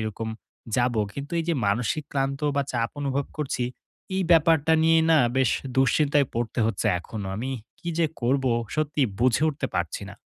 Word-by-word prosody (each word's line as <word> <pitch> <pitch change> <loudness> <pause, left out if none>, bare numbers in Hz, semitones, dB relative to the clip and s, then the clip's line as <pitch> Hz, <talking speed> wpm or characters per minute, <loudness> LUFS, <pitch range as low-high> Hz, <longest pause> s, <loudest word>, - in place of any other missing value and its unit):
এরকম 110 +1 -4 0.5
যাব। 120 0 +2 0.2
কিন্তু 140 +3 -7
এই 165 - -1
যে 170 - +2
মানসিক 115 +8 0
ক্লান্ত 135 0 -1 0.2
বা 140 - +3
চাপ 115 -2 0
অনুভব 140 0 -1
করছি, 135 -4 -2 0.5
এই 190 - +1
ব্যাপারটা 160 -1 +5
নিয়ে 165 0 +5
না 160 - +6 0.2
বেশ 130 -3 +3 0.3
দুশ্চিন্তায় 140 +2 +3
পড়তে 120 +1 -2
হচ্ছে 115 -4 -1
এখনো। 100 +3 -7
আমি 125 +5 -3 0.3
কি 175 - -7
যে 165 - +4 0.2
করব, 135 +3 +1 0.3
সত্যি 150 -1 0 0.2
বুঝে 130 +3 +3
উঠতে 150 -1 -2
পারছি - - -2
না। - - -9
135 Hz, 170 wpm, -25 LUFS, 120-155 Hz, 0.5 s, না